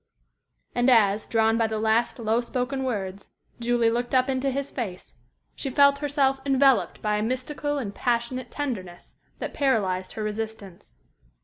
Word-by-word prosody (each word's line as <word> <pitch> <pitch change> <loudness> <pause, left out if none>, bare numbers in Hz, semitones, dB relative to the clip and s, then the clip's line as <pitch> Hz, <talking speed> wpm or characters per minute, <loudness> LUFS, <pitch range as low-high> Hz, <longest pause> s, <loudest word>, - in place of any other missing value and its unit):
And 245 +2 +2
as, 210 -4 +4
drawn 225 0 +2
by 225 - +3
the 220 0 -3
last, 220 +2 +1
low 230 0 +1
spoken 255 +2 -2
words, 195 -5 -4 0.3
Julie 235 -1 +2
looked 240 +2 -1
up 255 +1 +3
into 265 +1 0
his 275 +1 -3
face, 190 - -6 0.4
she 275 - -4
felt 280 +1 +5
herself 280 -2 +1
enveloped 270 -1 +3
by 210 -1 +1
a - - -1
mystical 260 +5 -2
and 215 -8 -4
passionate 245 +1 -1
tenderness 195 -12 -5 0.2
that - - -5
paralyzed 195 -10 0
her 220 - -4
resistance. 210 - -6
235 Hz, 150 wpm, -25 LUFS, 215-265 Hz, 0.4 s, felt